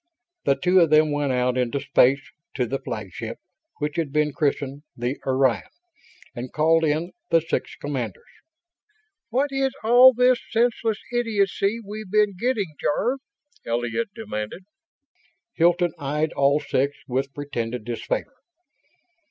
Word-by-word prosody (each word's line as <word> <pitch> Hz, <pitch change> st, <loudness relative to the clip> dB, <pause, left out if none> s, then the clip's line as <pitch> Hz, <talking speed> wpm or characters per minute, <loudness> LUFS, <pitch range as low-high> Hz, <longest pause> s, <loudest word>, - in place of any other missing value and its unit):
The 140 Hz, -, +4 dB
two 180 Hz, 0 st, +4 dB
then 155 Hz, 0 st, +4 dB
went 145 Hz, -2 st, 0 dB
out 125 Hz, 0 st, +1 dB
into 125 Hz, +3 st, 0 dB
space, 135 Hz, -1 st, +3 dB, 0.2 s
to 125 Hz, -, +1 dB
the 135 Hz, +4 st, -3 dB
flagship 110 Hz, -2 st, -6 dB, 0.4 s
which 150 Hz, +1 st, -3 dB
had 160 Hz, -4 st, -1 dB
been 150 Hz, 0 st, +1 dB
christened 140 Hz, -3 st, -1 dB, 0.2 s
the 120 Hz, +3 st, -2 dB
Orion 130 Hz, -5 st, +3 dB, 0.7 s
and 125 Hz, 0 st, -6 dB
called 165 Hz, +1 st, +3 dB
in 160 Hz, +3 st, 0 dB, 0.2 s
the 165 Hz, -, +5 dB
six 165 Hz, -, -3 dB
commanders. 130 Hz, -9 st, -4 dB, 1.1 s
"What 275 Hz, +4 st, +1 dB
is 270 Hz, -1 st, 0 dB
all 245 Hz, +3 st, +8 dB
this 250 Hz, 0 st, +3 dB
senseless 230 Hz, -1 st, +1 dB, 0.2 s
idiocy 215 Hz, -2 st, +1 dB
we've 210 Hz, 0 st, -7 dB
been 210 Hz, -1 st, +2 dB
getting, 205 Hz, -5 st, -1 dB
Jarve?" 245 Hz, -, 0 dB, 0.4 s
Elliott 120 Hz, -, -2 dB
demanded. 105 Hz, -, -5 dB, 0.9 s
Hilton 175 Hz, 0 st, +3 dB
eyed 150 Hz, +3 st, -1 dB
all 140 Hz, +1 st, +3 dB
six 140 Hz, 0 st, -1 dB
with 135 Hz, +2 st, -1 dB
pretended 120 Hz, -5 st, -4 dB
disfavor. 120 Hz, -, -3 dB
150 Hz, 125 wpm, -24 LUFS, 130-205 Hz, 1.1 s, all